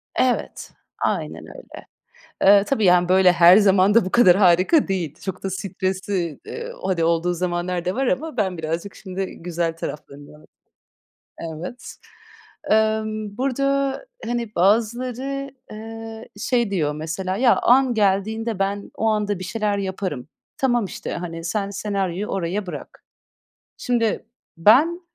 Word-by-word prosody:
Evet, 255 -1 -1 0.3
aynen - - -3
öyle. - - -12 0.8
Eee, 200 +1 +7
tabii, 220 -4 0
yani, 180 -1 +4
böyle, 185 0 +5
her 175 +1 +7
zaman 200 -1 +4
da 230 - +5
bu 185 - -4
kadar 190 -7 +6
harika 190 - +4
değil. 175 -6 -2
Çok 190 - -6
da 195 - -3
stresli, 190 -3 -3
eee, 475 +1 -6
hani, 180 -3 0
olduğu 170 +1 +1
zamanlar 175 0 -2
da 180 - -1
var 270 +2 0
ama 285 +2 -2
ben 190 -6 -1
birazcık 165 +5 -4
şimdi 190 -1 -5
güzel 170 -1 -2
taraflarını 150 -1 -9 0.9
Evet. 170 +9 -7 0.7
Emm, 215 -1 0
burada, 275 - 0 0.2
hani, 235 -2 -3
bazıları, 250 +7 0 0.2
eee, 225 +1 -8
şey 235 -2 +1
diyor 155 -7 0
mesela, 165 +5 -3
"Ya, 240 +2 +4
an 255 0 +4
geldiğinde 215 +2 0
ben 200 +1 -2
o 225 - -2
anda 210 -2 0
bir 185 - -6
şeyler 210 0 -1
yaparım. 190 -9 -4 0.3
Tamam, 245 -5 +1
işte, 190 - -6
hani, 165 -1 -6
sen 200 +4 -2
senaryoyu 200 -1 -2
oraya 190 0 -2
bırak." 180 - -9 0.7
Şimdi 230 -4 -1 0.3
ben, 280 - +4
200 Hz, 135 wpm, -22 LUFS, 180-225 Hz, 0.9 s, Eee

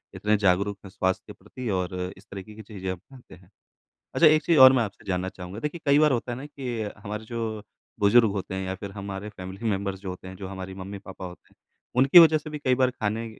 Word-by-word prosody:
इतने 105 0 +1
जागरूक 100 +1 +2
हैं, - - -9
स्वास्थ्य 95 0 -1
के - - -9
प्रति 125 -2 -6
और 90 -2 -1 0.2
इस 95 - -17
तरीके 100 +2 -8
की 110 - -9
चीज़ें 95 -3 -7
आप 95 - -5
ढूँढ़ते 130 -2 -14
हैं। 90 +1 -21 0.7
अच्छा 165 - +7
एक 155 0 +4
चीज़ 165 +1 +3
और 130 0 +10
मैं 125 - +3
आपसे 100 -2 -8
जानना 95 0 -1
चाहूँगा, 90 +2 -8
देखिए, 150 +6 -4
कई 140 +1 +5
बार 155 -2 +5
होता 120 0 -1
है 120 - -4
ना 135 - -7
कि 130 -6 -5
अ, 105 - -3
हमारे 105 +1 -5
जो 110 -2 -4 0.4
बुज़ुर्ग 110 +2 +5
होते 95 -1 -4
हैं 95 0 -3
या 95 0 -3
फिर 100 +1 -8
हमारे 100 0 -6
फैमिली 95 +1 -8
में 100 -1 -1
बर्स 95 -1 -4
जो 95 - -6
होते 90 0 -8
हैं, 95 - -8
जो 95 0 -7
हमारी 95 0 -7
मम्मी-पापा 95 0 -8
होते 90 -1 -12
हैं, - - -35 0.4
उनकी 135 +7 +8
वज़ह 160 -2 +7
से 155 +1 -8
भी 150 - -6
कई 130 -3 +2
बार 130 0 +3
खाने 110 -1 -2
105 Hz, 250 wpm, -26 LUFS, 95-125 Hz, 0.7 s, और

